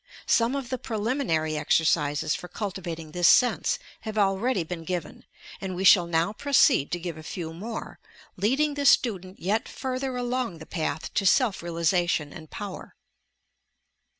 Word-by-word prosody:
Some 235 +3 +2
of 275 -3 -4
the 255 - -2
preliminary 210 - -1
exercises 150 -1 +1
for 180 - -5
cultivat 185 -5 -5
ing 160 -2 -10
this 175 +2 +3
sense 245 - +4 0.2
have 220 -1 -6
already 195 +1 +1
been 165 0 -6
given, 175 -2 -5 0.4
and 190 -2 -4
we 185 - -3
shall 180 -2 +7
now 170 +4 +1
proceed 265 - +3
to 175 - -1
give 170 -2 -5
a - - -8
few 160 0 -6
more, 220 +7 -7 0.4
leading 270 +10 +1
the 285 -1 0
student 190 -8 +2
yet 205 +5 -1
further 260 0 -3
along 245 -6 -2
the 160 - -10
path 155 -3 -3
to - - +1
self 225 +1 +3
realization 170 -2 0
and 155 -1 -11
power. 205 -3 -8
185 Hz, 155 wpm, -26 LUFS, 165-235 Hz, 0.4 s, shall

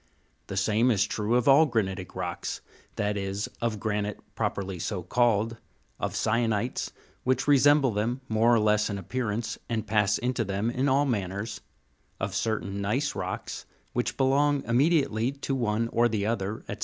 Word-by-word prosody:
The 95 - -5
same 110 +5 +3
is 105 -4 +3
true 105 +3 -1
of 125 -1 +2
all 145 +3 +7
granitic 95 -7 -2
rocks, - - -4 0.3
that 105 0 -1
is 100 +1 -2 0.2
of 115 -3 -1
granite 105 -1 -2
properly 95 -2 -2
so 90 +1 -3
called, 115 +2 +1 0.4
of - - -2
syenites, 115 +1 0 0.3
which 130 +1 +1
resemble 145 -1 +5
them 115 +5 -1
more 115 +1 +3
or 120 - +5
less 105 0 +2
in 100 - -3
appear 115 +5 -3
ance, 110 +2 -3
and 115 -2 -1
pass 105 -1 +2
into 125 -1 -1
them 100 +3 -1
in 130 +3 +1
all 140 +2 +3
manners, 100 -3 -3 0.6
of 95 0 -2
certain 100 -1 -2
gneiss 130 +9 0
rocks, - - -5 0.3
which 120 - -1
belong 140 +1 +3
immediately 135 -2 +2
to 140 0 -4
one 115 -3 0
or 120 +1 +3
the 105 -3 -1
other, 110 -1 -2
&c. - - -5
110 Hz, 165 wpm, -27 LUFS, 105-125 Hz, 0.6 s, all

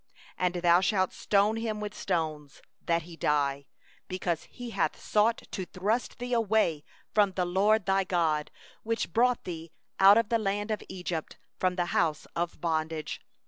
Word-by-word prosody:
11And 180 -1 0
thou 175 +1 +6
shalt 185 -1 +1
stone 205 +2 +2
him 225 -2 -2
with 210 0 -4
stones, 155 -7 -3 0.2
that 170 -1 +1
he 170 +1 -11
die; 140 -3 0 0.4
because 180 -3 -2
he 245 -1 -9
hath - - 0
sought 220 +2 +2
to 185 -3 -4
draw 205 +8 0 0.2
thee 245 +1 -4
away 215 -9 +2 0.3
from 205 -3 +3
the 180 -1 0
LORD 200 +3 +2
thy 195 0 +2
God, 165 -5 0 0.3
who 230 +1 0
brought 245 +6 +2
thee 165 -2 -7 0.3
out 195 +2 +8
of 230 -2 +2
the 230 -1 +2
land 205 +1 -1
of 215 - -1
Egypt, 180 -3 -4 0.2
out 185 -1 +2
of - - -12
the 175 - +1
house 160 -3 0
of 170 0 -2
bondage. 160 -2 -2
185 Hz, 170 wpm, -29 LUFS, 165-210 Hz, 0.4 s, out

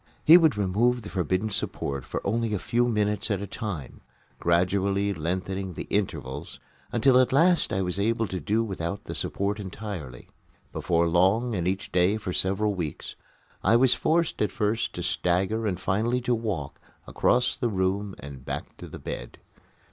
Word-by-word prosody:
He 160 - +10
would 160 -10 +5
remove 110 +5 +1
the 100 - -7
forbidden 95 +3 0
support 70 -7 -2
for - - -5
only 115 +1 0
a - - 0
few 120 +6 +1
minutes 105 -1 0
at 100 -3 0
a 100 - -4
time, 95 - -6 0.4
gradually 95 +3 +1
lengthening 95 +3 -3
the - - -4
intervals 90 -10 -3 0.3
until 125 +2 +4
at 130 - +3
last 170 +5 +4
I 95 - 0
was 90 +1 -2
able 115 +2 +1
to 95 - -3
do 105 +8 +1
without 95 -2 -4
the - - -6
support 100 +2 -2
entirely. 95 - -7 0.5
Before 85 -1 +1
long 95 +8 +3
and 90 -3 -1
each 95 +2 -2
day 90 +4 +3
for 100 -4 -4
several 100 +3 +1
weeks 85 -6 -5 0.5
I 115 - +4
was 125 +1 +5
forced 165 +1 +1
at 105 - +1
first 110 +2 -1
to - - -5
stagger 95 +6 0
and 90 -4 -2
finally 115 +6 0
to 125 0 +1
walk 100 -12 -3 0.3
across 125 +1 +2
the 120 - -1
room 95 0 -1
and 70 -3 -10
back - - -5
to - - -9
the - - -9
bed. - - -7
100 Hz, 170 wpm, -26 LUFS, 90-115 Hz, 0.5 s, He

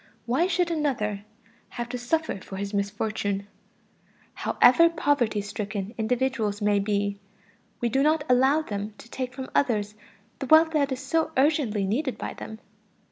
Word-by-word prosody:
Why 265 +9 +2
should 355 -1 +1
another 220 -10 -1 0.4
have 240 -1 -5
to 250 - -3
suffer 315 -1 -1
for 190 - -9
his 200 +1 -4
misfortune? 200 0 -2 0.9
However 335 +8 +5
poverty 285 -10 +1
stricken 205 0 -5
individuals 230 -2 0
may 205 -1 +2
be, 200 0 -1 0.6
we 240 - +2
do 270 +4 +1
not 305 +1 +3
allow 265 +5 +4
them 205 -3 -5
to - - -13
take 255 +1 -4
from 260 0 -7
others 210 -6 +1 0.5
the 270 - -4
wealth 320 +2 +6
that 285 -3 +1
is 260 0 -3
so 320 +4 0
urgently 265 -8 +2
needed 255 +7 -1
by - - -5
them. 220 - -8
240 Hz, 150 wpm, -26 LUFS, 205-285 Hz, 0.9 s, wealth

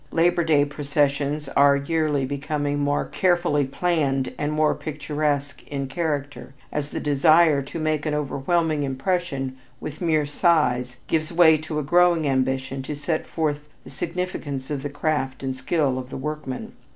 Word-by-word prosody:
Labor 170 +1 +3
Day 150 -3 +4
processions 145 0 -1
are 140 +1 +5
yearly 150 -1 0
becoming 145 +1 -2
more 145 0 +1
carefully 170 -2 +1
planned 135 -3 0
and 145 0 -2
more 155 0 +2
picturesque 145 -1 -2
in 140 -1 -3
character, 145 -2 -3 0.2
as 145 -1 -3
the - - -4
desire 155 +1 +4
to 140 +4 -7
make 155 -1 -1
an 150 - 0
overwhelming 150 +2 0
impression 135 -1 -2 0.2
with 155 +2 -7
mere 155 -3 +2
size 135 -6 +1
gives 155 0 -1
way 165 -2 +6
to 155 0 -5
a 150 - 0
growing 175 +1 +4
ambition 130 0 0
to 145 +3 -5
set 155 +2 -2
forth 150 -3 -1 0.2
the - - -12
significance 150 -4 -4
of 140 -2 -2
the 145 - -4
craft 140 -3 -2
and 135 -1 -1
the 130 - -12
skill 135 -1 +1
of 130 0 -8
the - - -6
workman. 150 -2 -5
145 Hz, 160 wpm, -24 LUFS, 140-160 Hz, 0.2 s, way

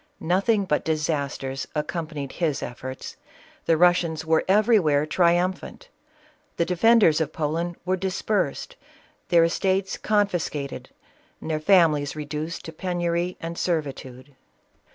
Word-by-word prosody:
Nothing 200 +4 +1
but 150 -5 0
disasters 145 -4 -2
accompanied 150 -2 -4
his 160 -5 -1
efforts: 130 +2 -7 0.5
the 165 - +4
Russians 170 -2 +2
were 160 0 +2
everywhere 190 -8 +3
triumphant; 180 - 0 0.7
the 170 - +2
defenders 180 -2 +4
of 155 -1 -1
Poland 165 +3 -2
were 185 +1 +1
dispersed, 190 -3 -2 0.5
their 170 -1 +5
estates 190 +3 0
confiscated, 175 -9 -1 0.5
their 155 -1 -3
families 155 -5 +3
reduced 150 +2 -5
to 160 - -8
penury 175 0 -2
and 170 +1 -6
servitude. 140 -5 -4
165 Hz, 110 wpm, -24 LUFS, 150-180 Hz, 0.7 s, their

